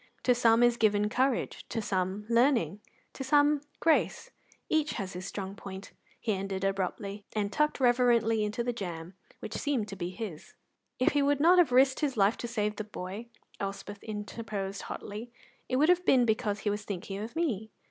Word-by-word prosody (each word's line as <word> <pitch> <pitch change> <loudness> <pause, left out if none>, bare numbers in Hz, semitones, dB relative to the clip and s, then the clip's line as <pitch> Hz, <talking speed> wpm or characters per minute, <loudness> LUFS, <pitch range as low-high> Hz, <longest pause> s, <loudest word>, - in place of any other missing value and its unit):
"To 250 - +5
some 235 -1 +4
is 240 -1 +4
given 210 -2 +3
courage, 260 +2 0
to 225 - -2
some 190 0 -1
learning, 230 - +3 0.3
to 270 - -5
some 290 +1 +4 0.2
grace. 310 - +1 0.4
Each 310 -1 +1
has 195 -4 -4
his 185 +2 -6
strong 195 -1 -5
point," 195 0 -9 0.3
he 220 - 0
ended 195 0 -3
abruptly, 195 +1 -2
and 205 -1 -1
tucked 300 -1 +1
reverently 240 -3 +3
into 210 +3 -2
the 245 0 -1
jam, 175 -5 -6 0.3
which - - -6
seemed 270 -8 -1
to 195 - -6
be 175 -2 -3
his. 185 -5 -7 0.4
"If 255 - +3
he 290 - +2
would 285 0 +2
not 350 +4 +6
have 335 -7 +4
risked 260 +1 +5
his 280 -5 -1
life 200 +2 +4
to 240 - -4
save 210 -3 -1
the 215 - -2
boy," 205 +2 -7 0.3
Elspeth 200 +1 -5
interposed 210 -2 -5
hotly, 215 +4 -7 0.4
"it 255 - 0
would 300 +5 +4
have 360 0 +4
been 255 -7 +5
because 210 -2 0
he 205 - 0
was 205 +1 -3
thinking 195 -1 -5
of 220 +6 -6
me." 230 - -1
220 Hz, 185 wpm, -30 LUFS, 200-255 Hz, 0.4 s, not